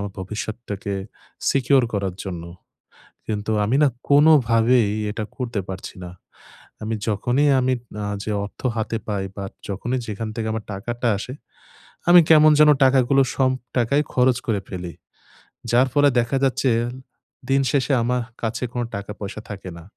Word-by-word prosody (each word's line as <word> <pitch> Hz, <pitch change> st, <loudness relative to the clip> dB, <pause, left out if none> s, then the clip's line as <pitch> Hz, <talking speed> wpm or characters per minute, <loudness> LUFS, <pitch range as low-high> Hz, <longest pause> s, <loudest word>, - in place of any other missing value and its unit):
আমার 100 Hz, -1 st, -5 dB
ভবিষ্যৎটাকে 105 Hz, 0 st, -5 dB, 0.6 s
সিকিউর 135 Hz, 0 st, +3 dB
করার 100 Hz, -3 st, -2 dB
জন্য। 90 Hz, -3 st, -5 dB, 0.8 s
কিন্তু 105 Hz, 0 st, -2 dB
আমি 115 Hz, -, +1 dB
না -, -, +6 dB, 0.2 s
কোনোভাবেই 125 Hz, -6 st, +5 dB, 0.2 s
এটা 110 Hz, -, -4 dB
করতে 120 Hz, -5 st, -3 dB
পারছি 95 Hz, -, -7 dB
না। 90 Hz, -, -8 dB, 0.7 s
আমি 110 Hz, +1 st, -2 dB
যখনই 120 Hz, +7 st, +1 dB
আমি 130 Hz, 0 st, +1 dB, 0.3 s
আ -, -, -2 dB, 0.2 s
যে 110 Hz, -, -3 dB
অর্থ 100 Hz, -, -13 dB, 0.2 s
হাতে 110 Hz, +1 st, -1 dB
পাই, 100 Hz, -2 st, -2 dB
বা 100 Hz, -, -5 dB, 0.3 s
যখনই 120 Hz, +6 st, -2 dB
যেখান 110 Hz, +1 st, -4 dB
থেকে 110 Hz, -1 st, -3 dB
আমার 110 Hz, -, -4 dB
টাকাটা 120 Hz, +5 st, -3 dB
আসে। 125 Hz, +5 st, -6 dB, 0.8 s
আমি 175 Hz, -, +9 dB
কেমন 155 Hz, -1 st, +7 dB
যেন 150 Hz, -, +7 dB
টাকাগুলো 135 Hz, +1 st, +4 dB
সম 130 Hz, -1 st, +3 dB, 0.3 s
টাকাই 130 Hz, +5 st, +2 dB
খরচ 125 Hz, -1 st, +3 dB
করে 105 Hz, -4 st, +1 dB
ফেলি। 90 Hz, -2 st, -6 dB, 0.8 s
যার 125 Hz, +2 st, +4 dB
ফলে 145 Hz, -1 st, +5 dB
দেখা 120 Hz, +3 st, 0 dB
যাচ্ছে 125 Hz, -3 st, +2 dB, 0.7 s
দিন 135 Hz, 0 st, +3 dB
শেষে 140 Hz, 0 st, +1 dB
আমা 125 Hz, +2 st, +1 dB, 0.3 s
কাছে 115 Hz, +3 st, -2 dB
কোনো 120 Hz, -1 st, -1 dB
টাকা-পয়সা 105 Hz, +1 st, -6 dB
থাকে 95 Hz, -2 st, -7 dB
না। 85 Hz, -, -11 dB
115 Hz, 145 wpm, -22 LUFS, 105-130 Hz, 0.8 s, আমি